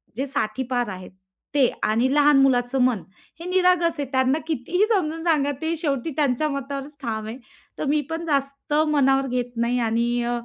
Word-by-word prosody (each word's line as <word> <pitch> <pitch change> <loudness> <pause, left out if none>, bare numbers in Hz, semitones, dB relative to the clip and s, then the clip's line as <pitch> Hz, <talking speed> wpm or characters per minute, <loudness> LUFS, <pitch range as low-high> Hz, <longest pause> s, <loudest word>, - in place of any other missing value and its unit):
जे 265 +4 -2
60ठी 255 -1 -2
पार 245 -3 0
आहेत 185 0 -11 0.4
ते 265 -4 +5 0.2
आणि 235 +5 +2
लहान 290 -1 +5
मुलाचं 255 -1 +2
मन 250 -5 +2 0.4
हे 335 - -8
निरागस 360 -2 +2
आहे. 285 - -1
त्यांना 260 +3 +2
कितीही 330 - 0
समजून 325 -4 -1
सांगा, 300 -4 +2
ते 320 +1 -1
शेवटी 295 -1 -2
त्यांच्या 290 +1 +1
मतावरच 275 +1 -5
ठाम 220 -2 -3
आहे. 225 +3 -6 0.4
तर - - -3
मी 300 +1 +2
पण 325 +1 -4
जास्त 280 -1 -2
मनावर 270 -2 +2
घेत 245 -1 -2
नाही 235 +1 +1
आणि 235 +1 +1
अ, 240 0 -1
275 Hz, 180 wpm, -23 LUFS, 245-305 Hz, 0.4 s, ते